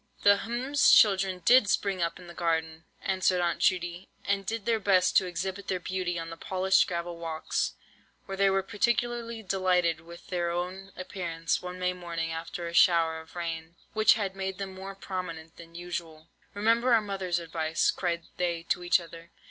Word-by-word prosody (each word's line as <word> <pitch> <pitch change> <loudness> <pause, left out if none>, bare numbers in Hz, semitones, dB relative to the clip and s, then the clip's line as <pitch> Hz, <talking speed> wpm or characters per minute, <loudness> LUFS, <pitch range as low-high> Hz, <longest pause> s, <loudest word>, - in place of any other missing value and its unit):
"The—hm's—children 205 -4 +4
did 245 -5 +6
spring 195 -3 0
up 170 0 -1
in 180 - -12
the 170 - -10
garden," 160 -1 -1 0.2
answered 185 -1 +1
Aunt 175 -1 0
Judy, 175 0 0 0.2
"and 200 -1 0
did 225 -1 -3
their 230 -1 +2
best 185 -3 +3
to 185 - +3
exhibit 190 +3 -4
their 185 -1 -1
beauty 180 -1 -2
on 165 0 -5
the 165 - -8
polished 190 +2 +2
gravel 170 -1 -4
walks, 160 -1 -2 0.5
where 195 - -5
they 195 0 +3
were 195 0 +1
particularly 235 +1 -1
delighted 180 -4 +1
with 170 +1 -13
their 175 -2 -1
own 180 +3 -4
appearance 170 -3 -2
one 180 0 -6
May 180 0 0
morning 170 -2 -4
after 170 +1 -5
a 170 - -6
shower 165 -2 +4
of 160 - -18
rain, 165 -1 -5 0.2
which 215 0 +5
had 195 -3 -3
made 190 -1 -4
them 195 -1 -5
more 195 +1 -8
prominent 170 -4 -6
than 170 0 -13
usual. 170 -2 -6 0.3
'Remember 230 +4 +3
our - - +5
mother's 195 -4 -2
advice,' 160 -1 0
cried 170 -2 -2
they 170 -2 -1
to 180 - 0
each 175 +1 +4
other. 170 0 -12
180 Hz, 175 wpm, -28 LUFS, 170-195 Hz, 0.5 s, did